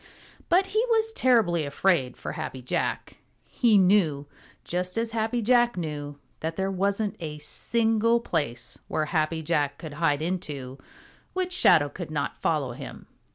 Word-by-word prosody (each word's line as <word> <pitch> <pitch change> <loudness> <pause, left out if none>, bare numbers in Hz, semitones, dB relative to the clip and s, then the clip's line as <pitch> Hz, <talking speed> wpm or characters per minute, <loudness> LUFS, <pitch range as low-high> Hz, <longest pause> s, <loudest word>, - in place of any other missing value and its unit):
But 365 +3 +4
he 435 +1 +3
was 445 -1 +2
terribly 220 - +3
afraid 140 -2 +1
for - - -5
Happy 130 -1 -6
Jack. 125 - -2 0.3
He 230 -4 +3
knew, 180 -7 +3 0.4
just 180 +2 -3
as 230 0 -1
Happy 225 +1 -1
Jack 240 -1 +3
knew, 145 -3 -4 0.2
that 160 +1 -3
there 190 +1 -1
wasn't 200 +2 0
a 155 -3 -5
single 225 +8 +1
place 145 - -3
where 155 - -1
Happy 160 0 -1
Jack 145 -3 0
could 155 -3 -8
hide 150 -1 +1
into 145 -7 -4 0.5
which 370 -1 -1
Shadow 155 - +5
could 170 +3 -7
not 145 -2 -3
follow 145 -6 0
him. 120 - -9
175 Hz, 150 wpm, -26 LUFS, 150-225 Hz, 0.5 s, Shadow